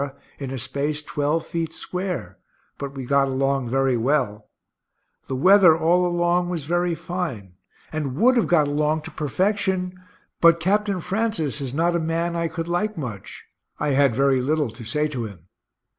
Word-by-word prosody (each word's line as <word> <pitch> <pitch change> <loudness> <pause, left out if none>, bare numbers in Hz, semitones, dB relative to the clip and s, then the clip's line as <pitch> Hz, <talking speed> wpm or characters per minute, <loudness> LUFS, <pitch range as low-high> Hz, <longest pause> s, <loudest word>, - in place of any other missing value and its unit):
in 135 -2 -4
a 135 - -4
space 145 +4 -2
twelve 150 +3 -1
feet 165 -1 -3
square, 170 - -5 0.4
but 140 0 -5
we 135 -2 -5
got 140 +1 +3
along 135 -1 0
very 135 0 +2
well 115 -4 0 0.8
the 130 - -3
weather 180 +2 +6
all 175 +3 +3
along 175 0 +1
was 165 -5 -3
very 175 +1 0
fine 150 - -5 0.4
and 145 -5 -2
would 250 - +4
have 235 - +2
got 155 -4 +3
along 150 +2 +1
to - - -8
perfection, 185 +4 -1 0.5
but 170 0 +6
Capt. 205 +5 +1
Francis 195 - -1
is 135 -3 -3
not 165 +5 +1
a 170 - +1
man 165 +1 -1
I 170 0 0
could 165 +1 -5
like 200 +5 -1
much 115 - -7 0.3
I 150 - 0
had 140 -3 +3
very 135 -1 +3
little 145 -1 0
to 115 +2 -11
say 150 +7 0
to 125 -6 -4
him. 95 -6 -11
155 Hz, 170 wpm, -23 LUFS, 135-175 Hz, 0.8 s, weather